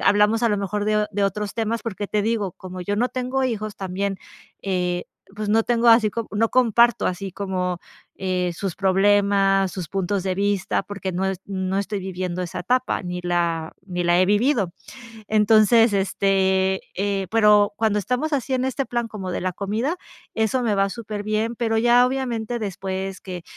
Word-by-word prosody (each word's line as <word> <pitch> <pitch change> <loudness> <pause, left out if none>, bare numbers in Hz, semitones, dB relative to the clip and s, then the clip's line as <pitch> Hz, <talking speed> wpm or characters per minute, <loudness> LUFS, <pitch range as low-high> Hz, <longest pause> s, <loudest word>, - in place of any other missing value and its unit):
hablamos 210 +3 +3
a - - +4
lo 205 - +1
mejor 205 +1 -2
de 210 0 +2
de 205 +1 -1
otros 200 +1 -2
temas 225 0 -1
porque 205 -2 -4
te 210 - 0
digo 215 -3 0
como 185 +1 -9
yo 205 +3 -2
no 245 +4 +1
tengo 255 +1 -1
hijos 215 -4 -3
también, 195 +1 -3 0.4
eh, 180 -2 -1 0.3
pues, 215 0 -3
no 220 +2 +3
tengo 235 0 +2
así 225 -1 +6 0.2
no 220 +2 +1
comparto 240 -2 +4
así 185 +1 -3
como, 185 -2 -2 0.4
eh, 180 -2 -1
sus 190 0 -4
problemas, 195 0 +3
sus 180 -5 -5
puntos 195 +2 -1
de 190 -1 0
vista, 200 -1 0
porque 200 -2 -5
no 180 +2 -1 0.2
no 190 -1 -2
estoy 200 +1 -2
viviendo 185 -1 -4
esa 180 0 -5
etapa, 250 +5 0
ni 180 -1 -4
la 170 -2 -1
ni 180 -2 -3
la 175 +1 +4
he - - +5
vivido. 210 - +2 0.6
Entonces, 220 +1 +5
este, 190 -1 +1 0.2
eh, 195 0 -1
pero, 210 -2 +5
cuando 215 -1 +1
estamos 255 +9 -2
así 270 -2 0
en 255 0 0
este 265 +1 -2
plan 240 -1 -2
como 190 -4 -5
de - - -2
la 185 0 -1
comida, 215 - -2 0.4
eso 225 +3 +1
me 220 -3 +1
va 195 0 +2
superbién, 215 +1 -3
pero, 225 -2 0
ya 240 +2 +5
obviamente, 245 -3 -2
después 190 -1 -4
que 180 -2 -7
205 Hz, 175 wpm, -23 LUFS, 190-225 Hz, 0.6 s, así